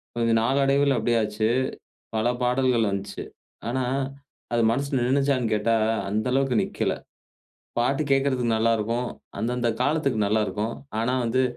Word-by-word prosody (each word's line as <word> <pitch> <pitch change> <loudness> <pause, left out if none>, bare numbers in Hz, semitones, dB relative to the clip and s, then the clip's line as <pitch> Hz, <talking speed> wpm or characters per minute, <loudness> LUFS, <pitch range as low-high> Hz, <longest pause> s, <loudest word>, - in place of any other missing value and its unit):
கொஞ்சம் 115 -1 +2
நாளடைவில 135 +2 +3
எப்டி 120 +2 +1
ஆச்சு, 110 +1 0 0.7
பல 110 +1 +1 0.2
பாடல்கள் 125 -3 +2
வந்துச்சு. 100 0 -4 0.5
ஆனா 130 +1 0 0.7
அது 120 - +3
மனசுல 140 +3 0
நின்னுச்சான்னு 130 -3 +1
கேட்டா 110 +2 +2 0.3
அந்த 110 +3 -1
அளவுக்கு 135 -2 +2
நிக்கல. - - -1 0.8
பாட்டு 135 +5 +1
கேக்கறதுக்கு 130 -4 +2
நல்லா 115 +1 +3
இருக்கும். 115 +3 -1 0.3
அந்தந்த 120 +1 0
காலத்துக்கு 140 -3 +1
நல்லா 110 +2 +2
இருக்கும். 110 +2 -2 0.2
ஆனா 120 +3 +1
வந்து 130 +3 +2
120 Hz, 130 wpm, -25 LUFS, 110-135 Hz, 0.8 s, நாளடைவில